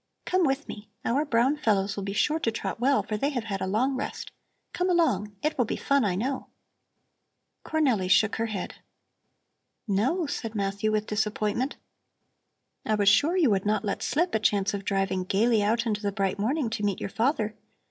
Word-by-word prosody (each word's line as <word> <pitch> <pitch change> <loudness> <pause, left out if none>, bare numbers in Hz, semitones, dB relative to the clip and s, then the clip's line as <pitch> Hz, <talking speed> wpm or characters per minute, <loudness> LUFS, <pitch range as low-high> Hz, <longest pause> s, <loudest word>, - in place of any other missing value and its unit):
Come 370 -1 +2
with 270 +1 -1
me! 210 0 -9 0.2
Our 280 +6 +1
brown 260 +2 +2
fellows 205 -7 +1
will 200 - -4
be 195 - -3
sure 300 +9 +1
to 230 - 0
trot 225 - -4
well, 270 +3 +3
for 215 - -3
they 275 +7 0
have 250 -6 -3
had 195 -3 -4
a - - -1
long 250 +8 +1
rest. 270 +2 -5 0.4
Come 360 +1 0
along! 210 - +1
It 305 +1 0
will 245 - +4
be - - -2
fun, 280 -2 +1
I 195 -4 +1
know." 260 +7 -2 1.2
Cornelli 255 -12 +1
shook 215 +2 +4
her 230 +1 0
head. 205 -5 -5 1.1
"No?" 255 - +1
said 225 -6 -4
Matthew 200 +1 -1
with 215 0 0
disappointment. 215 +4 -1 1.1
"I 215 - +1
was 205 -1 +4
sure 290 - +3
you 305 -10 +4
would 195 0 +1
not 215 +1 +1
let 200 - -2
slip 345 +4 0
a - - +2
chance 205 -1 +1
of 200 -1 -4
driving 195 -2 0
gaily 215 +4 +2
out 230 +3 +1
into 210 -2 -1
the 205 -1 -1
bright 195 -1 -1
morning 245 +3 0
to 215 -2 -3
meet 200 -2 0
your - - -3
father. 220 0 0
220 Hz, 195 wpm, -27 LUFS, 205-270 Hz, 1.2 s, will